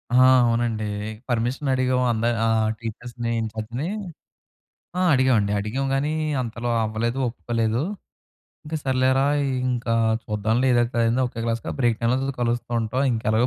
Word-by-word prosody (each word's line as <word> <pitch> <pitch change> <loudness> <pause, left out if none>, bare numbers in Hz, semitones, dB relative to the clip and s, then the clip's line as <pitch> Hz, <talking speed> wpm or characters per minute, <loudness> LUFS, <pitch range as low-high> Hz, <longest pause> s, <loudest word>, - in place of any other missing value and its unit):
ఆ! - - +6 0.3
అవునండి. 115 -2 0 0.4
పర్మిషన్ 125 +4 -1
అడిగాము 130 0 +1
అంద 115 0 -1 0.2
ఆహ్, 110 -1 +2
టీచర్స్‌ని, 115 +1 -5
ఇన్‌చార్జ్‌ని. 110 +6 -4 1.1
ఆ! - - +1
అడిగామండి. 120 -6 +3
అడిగాం 120 +7 -2
గానీ, 140 +2 0 0.3
అంతలో 120 0 -4
అవ్వలేదు 115 +4 -2
ఒప్పుకోలేదు. 115 0 -1 0.8
"ఇంకా 160 +1 -3
సర్లేరా 130 +1 +2 0.4
ఇంకా 120 -2 -1 0.3
చూద్దాంలే 110 +4 0
ఏదైతే 120 0 +1
అయిందో 120 +3 +2
ఓకే 115 -1 -6
క్లాస్‌గా 115 0 -2
బ్రేక్ 120 -3 +2
టైమ్‌లోల 130 +4 +1
కలుస్తూ 120 0 -1
ఉంటాం. 115 +4 -1
ఇంక 110 - -2
ఎలాగో 115 +3 +3
120 Hz, 130 wpm, -24 LUFS, 115-130 Hz, 1.1 s, ఆ